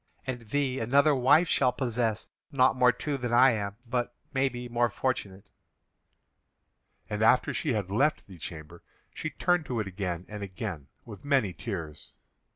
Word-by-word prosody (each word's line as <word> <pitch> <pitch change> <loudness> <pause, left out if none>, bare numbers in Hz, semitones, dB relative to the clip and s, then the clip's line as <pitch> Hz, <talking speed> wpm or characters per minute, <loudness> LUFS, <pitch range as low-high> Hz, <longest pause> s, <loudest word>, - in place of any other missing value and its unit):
And 120 -4 -5
thee 135 -1 0
another 140 +6 +4
wife 145 +6 +4
shall 130 -4 +3
possess, 120 -4 -2 0.2
not 130 -1 +4
more 125 -1 +5
true 145 +2 -3
than 120 -1 -3
I 125 +2 +6
am, 100 -3 -3
but, 120 0 -2 0.2
maybe, 130 -2 -1
more 120 0 +1
fortunate!" 100 -7 -3 1.6
And 105 0 -3
after 115 +3 +4
she 150 -6 -1
had 100 -4 -2
left 140 +9 +1
the 95 -4 -13
chamber, 80 +1 -9 0.3
she 155 - -4
turned 175 -1 0
to 120 -3 -2
it 110 - -1
again 90 -2 -4
and 105 -1 -7
again 85 -7 -6 0.2
with 105 -4 -11
many 135 -10 +1
tears. 85 -8 -7
120 Hz, 160 wpm, -28 LUFS, 100-130 Hz, 1.6 s, I